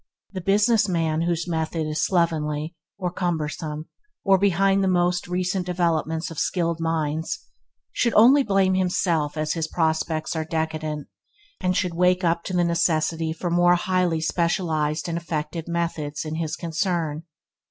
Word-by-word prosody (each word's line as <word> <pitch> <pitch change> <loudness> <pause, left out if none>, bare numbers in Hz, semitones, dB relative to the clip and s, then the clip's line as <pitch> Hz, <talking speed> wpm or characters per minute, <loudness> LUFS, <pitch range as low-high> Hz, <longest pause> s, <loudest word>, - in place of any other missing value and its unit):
The 190 -2 -5
business 205 +3 +3
man 165 -2 0
whose 170 0 -1
method 160 -1 -1
is 155 0 -1
slovenly, 160 -3 0 0.2
or 180 -3 -2
cumbersome, 155 -3 -3 0.4
or 195 -1 +4
behind 195 0 +3
the - - +2
most 180 -1 +1
recent 180 +1 -1
developments 165 -2 0
of 165 - -5
skilled 170 -2 0
minds, 160 -1 -1 0.5
should 235 - +1
only 255 +6 +7
blame 195 -5 +2
himself 175 -5 0
as 155 0 0
his 165 -2 -2
prospects 160 -1 -1
are 160 - -1
decadent, 155 -2 -3 0.5
and 185 -1 0
should 180 -1 0
wake 180 +2 +2
up 170 0 +1
to 185 - -4
the 175 -1 +3
necessity 165 -1 +1
for 170 +2 -3
more 175 +1 +5
highly 180 -2 0
specialized 160 -3 0
and 170 0 -2
effective 160 0 -4
methods 165 -3 -2
in 155 - -4
his 160 -2 -2
concern. 165 -2 -2
170 Hz, 150 wpm, -24 LUFS, 160-180 Hz, 0.5 s, only